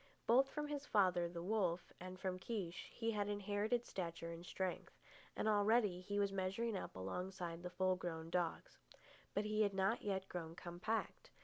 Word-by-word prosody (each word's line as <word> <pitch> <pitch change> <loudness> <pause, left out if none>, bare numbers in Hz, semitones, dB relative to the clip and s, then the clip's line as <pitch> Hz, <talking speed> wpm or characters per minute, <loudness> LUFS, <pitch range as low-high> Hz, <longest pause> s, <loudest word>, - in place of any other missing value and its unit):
Both 265 +4 +6
from 300 +1 -2
his 290 -1 -3
father, 180 -4 +4
the 170 0 -5
wolf, 185 -3 +1
and 185 +1 -7
from 185 -1 -1
Kiche, 190 -5 -3
he 230 -1 0
had 205 -2 0
inherited 205 +3 0
stature 170 -2 -3
and 170 0 -7
strength, 185 0 -3 0.4
and - - +1
already 210 -3 +4
he 205 +2 -2
was 200 -1 +3
measuring 195 +4 0
up 190 - -4
alongside 175 - -3
the 180 - -4
full 185 +1 +2
grown 165 -2 -4
dogs. 175 -2 -1 0.6
But 205 - +2
he 215 0 +2
had 200 -2 +3
not 195 +4 +2
yet 190 -2 -1
grown 165 -3 -5
compact. 180 +7 -2
190 Hz, 175 wpm, -40 LUFS, 175-210 Hz, 0.6 s, Both